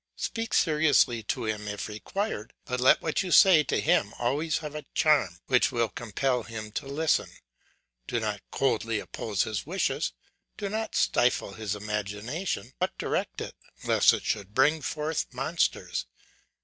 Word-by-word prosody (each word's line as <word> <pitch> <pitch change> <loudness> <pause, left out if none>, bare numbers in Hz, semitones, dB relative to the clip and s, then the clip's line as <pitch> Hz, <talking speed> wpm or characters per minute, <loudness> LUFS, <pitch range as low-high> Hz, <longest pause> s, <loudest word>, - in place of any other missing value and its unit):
Speak 225 -1 -2
seriously 150 -7 +3
to 110 - -3
him 105 -1 -3
if 105 -1 -4
required, 110 - -4
but 125 0 -2
let 130 - +5
what 160 - 0
you 190 - -4
say 185 -5 +8
to - - 0
him 175 +2 +2
always 145 +6 0
have 150 -2 -6
a 150 -1 -7
charm 135 - +3
which 130 +1 +3
will 115 -3 +1
compel 125 +3 -1
him 110 -1 -7
to 135 - -4
listen. 150 +3 +1 0.8
Do 120 - -1
not 105 -3 -3
coldly 115 -4 0
oppose 105 0 -2
his 110 +1 -4
wishes; 190 +4 -1 0.4
do 200 -2 -3
not 220 +2 -3
stifle 120 -5 +2
his 105 -1 -3
imagination, 105 - -3
but - - -1
direct - - -2
it - - -5 0.3
lest - - +5
it - - -2
should 105 0 -2
bring 150 +4 +4
forth 150 +2 -2
monsters. 145 +7 -1
125 Hz, 155 wpm, -28 LUFS, 110-155 Hz, 0.8 s, say